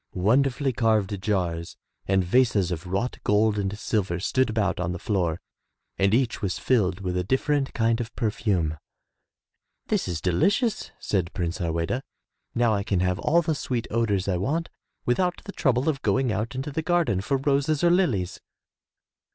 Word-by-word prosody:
'* - - -47 0.2
Wonderfully 135 +1 +2
carved 110 -4 +1
jars 90 -5 -2 0.3
and 95 -1 +3
vases 100 -2 +2
of 90 +1 -4
wrought 100 +7 -2
gold 105 0 +2
and 100 +1 -2
silver 95 -5 -1
stood 130 +7 +1
about 110 -5 0
on 90 0 -1
the - - -4
floor 90 -4 -1 0.6
and 95 +5 +2
each 120 +1 +1
was 95 -4 -1
filled 100 -7 +1
with 90 -2 -2
a 90 - 0
different 135 +6 0
kind 115 -1 +2
of 115 -1 -7
perfume. 95 - 0 1.1
"This - - +1
is 85 -3 -2
delicious,'' 200 - +1
said 90 -4 -1
Prince 85 -2 -2
Harweda. 85 +8 -1 0.5
"Now 120 -2 +3
I 100 - 0
can 100 -3 0
have 90 0 0
all 170 +3 +3
the 160 - 0
sweet 125 -5 -3
odors 105 -5 +1
I 95 -2 +1
want 150 - -1 0.4
without 180 +8 0
the 200 - -6
trouble 130 -6 +1
of 145 -4 0
going 130 -2 +1
out 110 +2 -2
into 135 +3 -3
the 160 - -2
garden 165 - +1
for 135 +7 0
roses 140 +3 +1
or 170 - +5
lilies." 130 - +1
110 Hz, 170 wpm, -25 LUFS, 95-130 Hz, 1.1 s, or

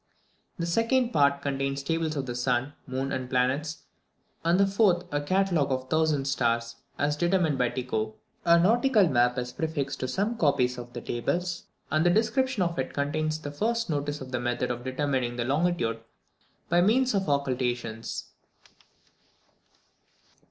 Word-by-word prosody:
The 170 - -2
second 230 +7 +2
part 140 -3 +3
contains 135 0 -2
tables 165 0 -1
of 140 -2 -2
the 120 - -4
sun, 125 +3 0
moon, 130 +1 -2
and 130 -1 -3
planets; 130 +5 0 0.6
and 170 +3 +3
the 200 - +6
fourth 195 -3 +2
a 145 - +1
catalogue 175 -3 +1
of 130 0 0
1000 155 +1 +1
stars, 115 -3 0 0.2
as 145 +1 +1
determined 175 -3 +1
by 125 -1 +3
Tycho. 110 -4 -3 0.3
A 170 0 +6
nautical 220 +2 +4
map 125 -3 +2
is 125 0 -3
prefixed 150 -4 -3
to 130 - -2
some 210 - -1
copies 125 -5 +2
of 120 0 -9
the 120 - -5
tables, 175 +11 -2 0.3
and 155 +2 +3
the 175 - +4
description 225 +3 +2
of 170 -4 -2
it 130 - -3
contains 155 +2 -1
the 145 -2 -7
first 230 +6 -1
notice 145 0 -2
of 130 -1 -8
the 125 - -1
method 120 +1 -1
of 120 0 -5
determining 130 -2 -1
the 120 -1 -2
longitude 140 -5 0 0.7
by 175 +1 +3
means 245 +7 +3
of 195 -5 0
occultations. 125 -5 -2
145 Hz, 160 wpm, -27 LUFS, 125-175 Hz, 0.7 s, the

